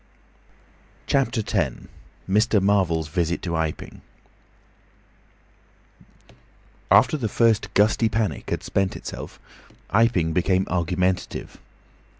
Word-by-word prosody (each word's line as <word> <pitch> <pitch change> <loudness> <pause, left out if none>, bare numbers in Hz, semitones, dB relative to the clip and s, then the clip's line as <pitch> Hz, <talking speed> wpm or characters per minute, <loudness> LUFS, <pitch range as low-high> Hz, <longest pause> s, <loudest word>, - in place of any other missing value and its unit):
CHAPTER 130 -4 +1
X. - - -1 0.5
MR. 105 +2 +3
MARVEL'S 95 -5 +1
VISIT 85 +2 -1
TO 85 -2 -2
IPING 80 -1 -4 2.9
After 155 - +5
the 115 -6 -2
first 115 0 +2
gusty 110 +2 +3
panic 110 0 -2
had - - -3
spent 95 -1 -1
itself - - -8 0.5
Iping 100 -7 +2
became 95 +2 +1
argumentative. 90 +1 -2
95 Hz, 90 wpm, -23 LUFS, 85-110 Hz, 2.9 s, After